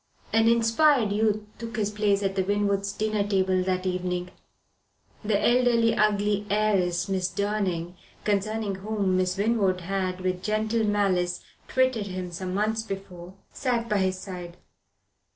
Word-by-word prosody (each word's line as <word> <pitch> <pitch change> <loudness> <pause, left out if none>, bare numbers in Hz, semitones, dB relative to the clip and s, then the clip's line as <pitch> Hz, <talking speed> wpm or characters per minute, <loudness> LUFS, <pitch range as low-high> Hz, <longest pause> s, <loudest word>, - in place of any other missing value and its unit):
An 225 0 +4
inspired 230 +1 +4
youth 215 0 +1 0.2
took 230 -1 -6
his 210 -1 0
place 205 -1 +1
at 195 -1 0
the 190 - +1
Winwoods' 200 0 0
dinner 215 0 -1
table 190 -2 +1
that 185 0 -1
evening. 180 -1 -2 0.9
The 210 -1 +1
elderly, 240 -1 +3
ugly 205 -1 +1
heiress, 195 -4 +1
Miss 185 -2 0
Durning, 185 -3 -2 0.3
concerning 210 0 0
whom 200 -2 -1
Miss 185 0 0
Winwood 200 -3 +1
had, 185 0 -2
with 185 -1 -1
gentle 215 +2 0
malice, 190 -4 +1 0.2
twitted 255 -5 +1
him 185 -2 -5
some 180 +1 -5
months 215 +3 0
before, 190 -3 -8 0.2
sat 240 -3 -1
by 210 -2 +1
his 185 -1 0
side. 180 -3 -8
200 Hz, 140 wpm, -26 LUFS, 185-215 Hz, 0.9 s, An